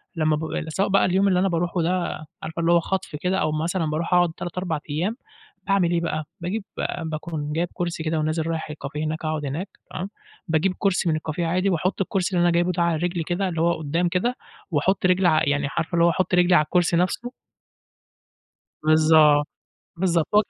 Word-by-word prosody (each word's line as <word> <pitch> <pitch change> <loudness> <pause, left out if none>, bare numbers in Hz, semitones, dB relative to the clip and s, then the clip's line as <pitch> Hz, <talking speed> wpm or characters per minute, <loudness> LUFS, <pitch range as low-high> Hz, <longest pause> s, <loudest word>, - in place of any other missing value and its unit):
لمّا 155 -1 +2
ب 160 +1 -4
سواء 190 +5 0
بقى 195 - +4
اليوم 190 +2 +2
اللي 180 -2 +3
أنا 195 - +2
باروحه 170 +1 0
ده 175 -2 -1 0.2
عارفة 160 +2 -5
اللي 170 +1 +2
هو 170 - +6
خطف 185 -3 -3
كده، 180 +5 -1
أو 155 - +1
مثلًا 165 +2 -1
باروح 155 +4 -2
أقعد 175 -2 +4
3، 175 0 -6
4 165 -5 -2
أيام 175 +10 -1 0.5
باعمل 190 -3 +2
إيه 170 -1 +1
بقى؟ 155 -2 -2 0.2
باجيب 195 +4 -3 0.4
باكون 155 -1 -4
جايب 170 +2 0
كرسي 170 -3 -3
كده 160 0 0
ونازل 155 +1 -1
رايح 160 -1 -3
الكافيه 150 +1 -5
هناك 155 +1 -3
أقعد 155 -2 -2
هناك، 160 +9 -3 0.2
تمام، 190 +3 -4 0.4
باجيب 170 +4 +1
كرسي 185 -4 +1
من 155 - +2
الكافيه 160 +2 -3
عادي 185 +3 +1
واحط 185 +3 0
الكرسي 190 -1 -1
اللي 175 - +3
أنا 175 - +4
جايبُه 175 +1 +2
ده 175 -1 0
عليه 170 -1 0
رجلي 175 -2 -1
كده 185 +3 -1
اللي 165 -2 -2
هو 170 0 +2
قدّام 165 +4 0
كده، 210 +9 0 0.4
واحط 185 +6 +1
رجلي 180 -3 +4
يعني 145 0 +1
عارفة 170 +2 -2
اللي 170 0 +4
هو - - +5
أحط 180 +1 -1
رجلي 175 0 +5
على 150 - +5
الكرسي 175 -1 +2
نفسه. 235 +7 -1 1.5
بالضبط، 155 -1 +5 0.5
بالضبط 170 -3 +1
و - - +6
170 Hz, 200 wpm, -24 LUFS, 155-180 Hz, 1.5 s, هو